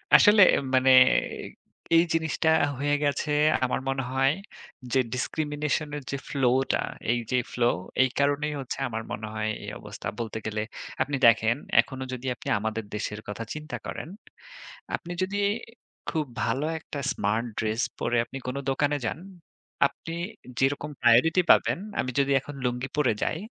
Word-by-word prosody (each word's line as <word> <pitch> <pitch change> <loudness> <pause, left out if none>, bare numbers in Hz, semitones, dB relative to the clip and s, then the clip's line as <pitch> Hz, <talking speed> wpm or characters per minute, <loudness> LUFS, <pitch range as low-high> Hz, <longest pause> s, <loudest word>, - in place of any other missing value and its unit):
আসলে 205 0 +7
এ - - +1 0.2
মানে 130 0 +5 0.2
এ - - +5 0.8
এই 165 - +6
জিনিসটা 160 0 +1 0.3
হয়ে 145 +2 +1
গেছে 145 +1 0 0.4
আমার 125 - -1
মনে 135 0 -1
হয় 135 +1 +3 0.6
যে 135 - +4
ডিসক্রিমিনেশনের 150 +2 -2
যে 140 - -1
ফ্লোটা, 130 -1 +2 0.3
এইযে 120 +1 -1
ফ্লো, 120 -1 +2 0.4
এই 130 - +2
কারণেই 145 +2 +1
হচ্ছে 130 - -5
আমার 115 -1 -4
মনে 110 +1 -4
হয় 110 0 -1
এই - - -5
অবস্থা। - - -8
বলতে 110 -1 -3
গেলে 110 0 -2 0.4
আপনি 140 +1 0
দেখেন 115 0 +4 0.3
এখনো 130 -1 -7
যদি 130 0 -6
আপনি - - -7
আমাদের 110 +1 -2
দেশের 105 0 -3
কথা 105 +2 -5
চিন্তা 155 +1 -6
করেন, - - -6 0.9
আপনি 175 - -8
যদি 200 +2 -2 0.7
খুব 155 -2 -1 0.2
ভালো 130 +6 0
একটা 145 - -7
স্মার্ট 110 +4 0
ড্রেস 110 +1 0 0.2
পরে 120 0 0
আপনি 135 - -8
কোন 125 - -3
দোকানে 145 +2 +1
যান, 110 - -2 0.7
আপনি 165 +3 -9 0.5
যেরকম 140 +2 0
প্রায়োরিটি 125 +10 +5
পাবেন, - - +4 0.2
আমি 130 - 0
যদি 140 0 +2
এখন 145 +2 -9
লুঙ্গি 125 +2 -2
পরে 130 -7 +3
যাই 160 - -1
135 Hz, 150 wpm, -27 LUFS, 120-150 Hz, 0.9 s, আসলে